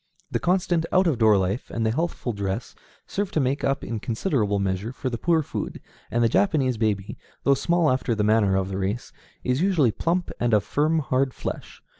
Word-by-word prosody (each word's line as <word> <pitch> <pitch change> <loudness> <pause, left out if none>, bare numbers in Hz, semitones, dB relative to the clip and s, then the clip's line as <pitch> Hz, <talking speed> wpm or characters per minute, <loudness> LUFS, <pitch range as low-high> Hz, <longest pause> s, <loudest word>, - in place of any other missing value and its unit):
The - - 0
constant 175 -2 +1
out 185 +1 +4
of 150 -8 +1
door 110 -2 +5
life 95 +5 -1
and 115 -1 -2
the 110 - +2
healthful 145 -3 -2
dress 100 +3 -3 0.3
serve 205 -1 -2
to - - +2
make 135 0 0
up 135 0 0
in 115 -2 -3
considerable 110 - 0
measure 100 +3 -1
for 130 0 -4
the 115 - -2
poor 165 -2 +2
food, - - -5 0.3
and 120 +3 +1
the - - +5
Japanese 135 - +2
baby, 105 -3 -1 0.2
though 140 - +5
small 170 +4 +2
after 130 -2 0
the 105 - 0
manner 105 -2 +3
of 95 0 0
the 95 0 -3
race, 100 +5 -3 0.3
is 125 +3 0
usually 170 - +3
plump, 175 - -1
and 120 -2 +3
of 105 - +2
firm, 155 +3 +1
hard 130 -1 0
flesh. - - -6
125 Hz, 205 wpm, -25 LUFS, 105-160 Hz, 0.3 s, door